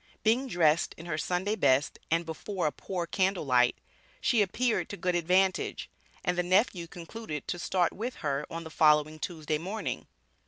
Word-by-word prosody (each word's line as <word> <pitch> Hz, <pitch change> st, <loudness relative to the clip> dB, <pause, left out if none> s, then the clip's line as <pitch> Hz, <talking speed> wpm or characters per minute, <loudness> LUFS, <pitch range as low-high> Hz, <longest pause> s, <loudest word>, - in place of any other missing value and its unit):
Being 240 Hz, +5 st, +3 dB
dressed 170 Hz, -6 st, +2 dB
in 165 Hz, -, -10 dB
her 155 Hz, -3 st, -2 dB
"Sunday 180 Hz, +7 st, 0 dB
best" 140 Hz, -8 st, +2 dB
and 165 Hz, +1 st, +1 dB
"before 180 Hz, +4 st, -3 dB
a 150 Hz, -, +2 dB
poor 180 Hz, +1 st, -4 dB
candle 190 Hz, -1 st, 0 dB
light," 125 Hz, -2 st, +4 dB, 0.4 s
she 235 Hz, -4 st, +3 dB
appeared 230 Hz, +4 st, 0 dB
to 200 Hz, -, -6 dB
good 180 Hz, -2 st, 0 dB
advantage; 185 Hz, +2 st, +1 dB, 0.3 s
and 180 Hz, -, +1 dB
the 180 Hz, -, +2 dB
nephew 185 Hz, -1 st, +2 dB
concluded 170 Hz, -2 st, -7 dB
to 175 Hz, -, -2 dB
start 175 Hz, -1 st, +1 dB
with 240 Hz, +5 st, -4 dB
her 140 Hz, 0 st, -1 dB
on 165 Hz, 0 st, -5 dB
the 160 Hz, -, -9 dB
following 155 Hz, 0 st, +4 dB
Tuesday 155 Hz, -2 st, -2 dB
morning. 195 Hz, +7 st, -4 dB
175 Hz, 170 wpm, -29 LUFS, 155-195 Hz, 0.4 s, light